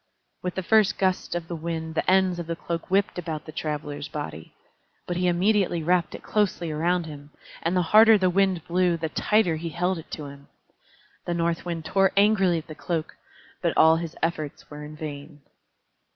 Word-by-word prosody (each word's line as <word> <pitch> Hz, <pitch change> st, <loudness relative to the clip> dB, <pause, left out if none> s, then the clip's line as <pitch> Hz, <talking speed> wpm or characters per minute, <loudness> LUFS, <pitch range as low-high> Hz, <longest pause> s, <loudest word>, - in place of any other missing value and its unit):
With 180 Hz, -1 st, -4 dB
the 190 Hz, -, -2 dB
first 215 Hz, +1 st, +3 dB
gust 185 Hz, -2 st, 0 dB
of 170 Hz, -1 st, -3 dB
wind 160 Hz, -1 st, -4 dB
the 165 Hz, -, 0 dB
ends 185 Hz, -2 st, +3 dB
of 170 Hz, -, -5 dB
the 165 Hz, -, -2 dB
cloak 165 Hz, 0 st, -5 dB
whipped 195 Hz, -1 st, +1 dB
about 160 Hz, -3 st, -5 dB
the 155 Hz, -, -8 dB
Traveler's 150 Hz, -2 st, -4 dB
body. 80 Hz, -, -7 dB, 0.5 s
But 175 Hz, -, -3 dB
he 180 Hz, +1 st, +1 dB
immediately 180 Hz, -1 st, +2 dB
wrapped 175 Hz, +1 st, +1 dB
it -, -, -10 dB
closely 195 Hz, -6 st, 0 dB
around 170 Hz, +3 st, 0 dB
him, 145 Hz, -2 st, -10 dB, 0.3 s
and 170 Hz, +3 st, 0 dB
the 180 Hz, -, +3 dB
harder 220 Hz, +4 st, +7 dB
the 185 Hz, -2 st, +2 dB
Wind 190 Hz, -3 st, +1 dB
blew, 175 Hz, 0 st, +2 dB
the 160 Hz, -1 st, -3 dB
tighter 190 Hz, -1 st, +2 dB
he 165 Hz, +1 st, -4 dB
held 180 Hz, +2 st, -1 dB
it 160 Hz, -, -12 dB
to 150 Hz, -, -5 dB
him. 140 Hz, 0 st, -11 dB, 0.8 s
The 175 Hz, -, 0 dB
North 170 Hz, 0 st, -1 dB
Wind 165 Hz, -2 st, -4 dB
tore 195 Hz, +3 st, +2 dB
angrily 200 Hz, -4 st, +4 dB
at 160 Hz, -, -5 dB
the 155 Hz, -, -9 dB
cloak, 160 Hz, 0 st, -4 dB, 0.5 s
but -, -, 0 dB
all 160 Hz, +1 st, +6 dB
his 165 Hz, -1 st, -5 dB
efforts 155 Hz, -4 st, -3 dB
were 150 Hz, 0 st, -8 dB
in 150 Hz, +1 st, -9 dB
vain. 145 Hz, -1 st, -8 dB
170 Hz, 195 wpm, -25 LUFS, 155-185 Hz, 0.8 s, harder